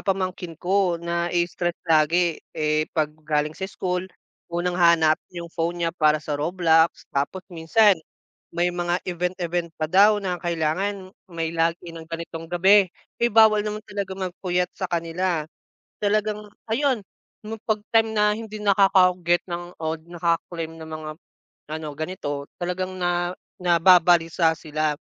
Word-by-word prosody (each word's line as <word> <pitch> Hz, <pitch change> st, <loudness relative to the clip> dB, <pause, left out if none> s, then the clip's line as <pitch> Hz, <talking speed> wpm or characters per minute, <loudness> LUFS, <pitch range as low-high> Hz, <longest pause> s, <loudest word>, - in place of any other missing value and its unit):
pamangkin 185 Hz, -3 st, -3 dB
ko 185 Hz, -1 st, +1 dB
na 170 Hz, 0 st, -2 dB
i-stress 175 Hz, 0 st, -1 dB
lagi 165 Hz, +1 st, +3 dB, 0.2 s
eh 155 Hz, 0 st, +1 dB
pag 155 Hz, -2 st, 0 dB
galing 150 Hz, 0 st, 0 dB
sa 190 Hz, +3 st, -5 dB
school, 180 Hz, -1 st, -3 dB, 0.4 s
unang 175 Hz, +1 st, -1 dB
hanap 170 Hz, -3 st, +4 dB
yung 170 Hz, -1 st, -7 dB
phone 170 Hz, +1 st, -2 dB
niya 165 Hz, -, 0 dB
para 155 Hz, -3 st, +3 dB
sa 150 Hz, -1 st, -4 dB
Roblox. 165 Hz, +1 st, +2 dB
Tapos 145 Hz, +7 st, -2 dB
minsan 190 Hz, +6 st, +4 dB, 0.6 s
may 175 Hz, +1 st, 0 dB
mga 175 Hz, 0 st, 0 dB
event 180 Hz, +1 st, -2 dB
event 175 Hz, -1 st, -2 dB
pa 155 Hz, -, -2 dB
daw 200 Hz, +6 st, +5 dB
na 185 Hz, -3 st, -3 dB
kailangan 185 Hz, +3 st, -2 dB, 0.2 s
may 165 Hz, -1 st, -3 dB
lagi 165 Hz, +1 st, -1 dB
ng 165 Hz, -1 st, -10 dB
ganitong 165 Hz, 0 st, -6 dB
gabi, 190 Hz, +3 st, +5 dB, 0.3 s
ay 235 Hz, -, +4 dB
bawal 220 Hz, -1 st, +6 dB
naman 210 Hz, 0 st, -5 dB
talaga 200 Hz, -2 st, -4 dB
magpuyat 180 Hz, -1 st, -2 dB
sa 185 Hz, -, -4 dB
kanila. 170 Hz, -1 st, -1 dB, 0.5 s
Talagang 210 Hz, 0 st, 0 dB, 0.3 s
ayun 260 Hz, 0 st, +1 dB, 0.6 s
pag 215 Hz, -2 st, 0 dB
time 225 Hz, -1 st, +3 dB
na 210 Hz, -1 st, +2 dB
hindi 215 Hz, -1 st, -7 dB
nakaka 195 Hz, -3 st, +4 dB
get 175 Hz, +1 st, +3 dB
ng 175 Hz, 0 st, -5 dB
o 160 Hz, 0 st, -1 dB, 0.2 s
naka 170 Hz, -1 st, +1 dB, 0.2 s
claim 165 Hz, -1 st, -5 dB
ng 160 Hz, -, -9 dB
mga 155 Hz, -1 st, -6 dB, 0.6 s
ano 155 Hz, 0 st, -4 dB
ganito. 145 Hz, -3 st, -4 dB, 0.2 s
Talagang 185 Hz, +1 st, -3 dB
na 175 Hz, 0 st, 0 dB, 0.3 s
nababalisa 170 Hz, -1 st, +4 dB
sila. 155 Hz, -1 st, -2 dB
175 Hz, 145 wpm, -24 LUFS, 165-190 Hz, 0.6 s, bawal